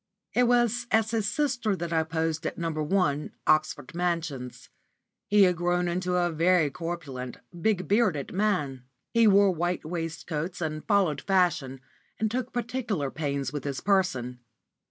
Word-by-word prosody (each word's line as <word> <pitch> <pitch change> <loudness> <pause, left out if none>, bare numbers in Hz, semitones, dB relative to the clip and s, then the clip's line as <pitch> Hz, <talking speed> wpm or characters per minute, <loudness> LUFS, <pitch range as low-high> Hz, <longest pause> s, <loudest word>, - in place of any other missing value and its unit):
It 245 0 +4
was 240 0 +2
as 220 0 +2
his 220 -3 0
sister 250 -8 0
that 170 -2 -4
I 160 - +3
posed 160 0 -2
at - - -5
No. 165 -1 -2
1, 155 -1 0
Oxford 155 -4 +1
Mansions. 165 -7 -3 0.6
He 205 -1 +5
had 180 -1 +4
grown 175 +1 +1
into 180 +1 -1
a 175 -1 +2
very 165 -1 +3
corpulent, 140 -7 -5 0.2
big 190 -5 +1
bearded 200 - +1
man. 150 -11 0 0.3
He 230 -1 +5
wore 200 -1 +6
white 175 0 -2
waistcoats, 165 0 -4
and 155 -2 -3
followed 195 -8 +2
fashion, 160 -9 +1 0.4
and 220 -1 0
took 255 +1 -2
particular 230 - -2
pains 140 -2 -2
with 145 -3 -4
his 140 -2 -3
person. 130 -11 0
175 Hz, 150 wpm, -27 LUFS, 155-205 Hz, 0.6 s, wore